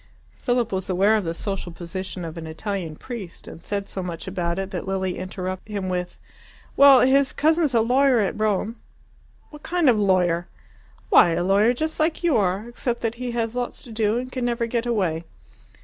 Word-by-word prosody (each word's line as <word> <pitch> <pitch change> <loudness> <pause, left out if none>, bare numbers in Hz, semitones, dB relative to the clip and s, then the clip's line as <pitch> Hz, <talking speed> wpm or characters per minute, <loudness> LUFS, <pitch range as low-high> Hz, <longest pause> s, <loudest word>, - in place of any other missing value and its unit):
Philip 245 -3 0
was 190 0 -2
aware 195 +4 +3
of 210 -4 0
the 165 - -2
social 195 -2 -4
position 180 +1 -6
of 160 0 -7
an 165 -1 -7
Italian 170 -1 -4
priest, 210 -4 -8
and - - -10
said 200 -1 -3
so 195 - -5
much 175 -3 -5
about 175 -2 -2
it 195 0 -3
that - - -5
Lilia 190 -1 -2
interrupted 185 +2 -5
him 195 -2 -2
with, 180 -1 -3 0.6
"Well, 280 -2 +8
his 270 +1 +4
cousin's 315 -3 +2
a 230 - +5
lawyer 255 +2 +3
at 205 0 -1
Rome." 215 +1 0 0.7
"What 300 -1 -12
kind 350 -2 0
of 235 -4 +5
'lawyer'?" 180 -3 +2 0.6
"Why, 175 - +6
a 175 +1 0
lawyer 205 +6 +3
just 315 +5 -3
like 315 +2 0
you 335 -6 +3
are 200 +1 +1
except 240 0 -3
that 230 -1 -1
he 250 - -2
has 230 0 -2
lots 245 -1 -4
to 240 - -11
do 220 0 +1
and 255 +1 -4
can 255 -1 -3
never 235 -1 0
get 235 +1 -2
away." 180 -8 0
210 Hz, 195 wpm, -23 LUFS, 185-245 Hz, 0.7 s, Well